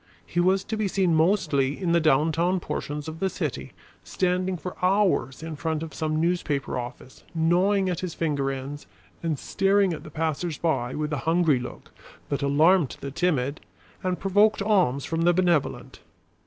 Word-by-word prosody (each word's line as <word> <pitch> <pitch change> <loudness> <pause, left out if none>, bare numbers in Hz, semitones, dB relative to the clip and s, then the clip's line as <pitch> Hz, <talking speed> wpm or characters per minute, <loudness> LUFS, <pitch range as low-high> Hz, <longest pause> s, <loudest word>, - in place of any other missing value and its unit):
He 175 - -2
was 190 +2 +3
to 220 - -4
be 215 -2 0
seen 185 -3 +1
mostly 155 -5 +2
in 180 -3 0
the 170 - +4
downtown 160 +4 +2
portions 150 -3 -4
of 160 0 -7
the 190 - +1
city, 135 - -4 0.3
standing 185 0 -1
for 180 +3 -7
hours 185 -7 +2
in 160 -1 -5
front 160 +1 -2
of 160 - -7
some 155 -1 -1
newspaper 160 -6 -1
office, 125 +1 -9
gnawing 185 +4 +2
at 180 -3 -1
his 180 -3 -5
finger 145 -4 0
ends, 135 +2 -6 0.3
and 160 -3 -1
staring 195 +3 +2
at - - -7
the - - -10
passers 160 +1 -2
by 130 -7 -1
with 150 0 -2
a - - 0
hungry 165 -5 +3
look 125 - -9 0.4
that 140 - -1
alarmed 150 +3 +3
the 140 - -5
timid 150 -4 0 0.4
and 185 -1 -2
provoked 205 +2 +3
alms 185 - +2
from 165 0 -2
the 175 +1 +4
benevolent. 175 -4 0
165 Hz, 170 wpm, -25 LUFS, 145-185 Hz, 0.4 s, the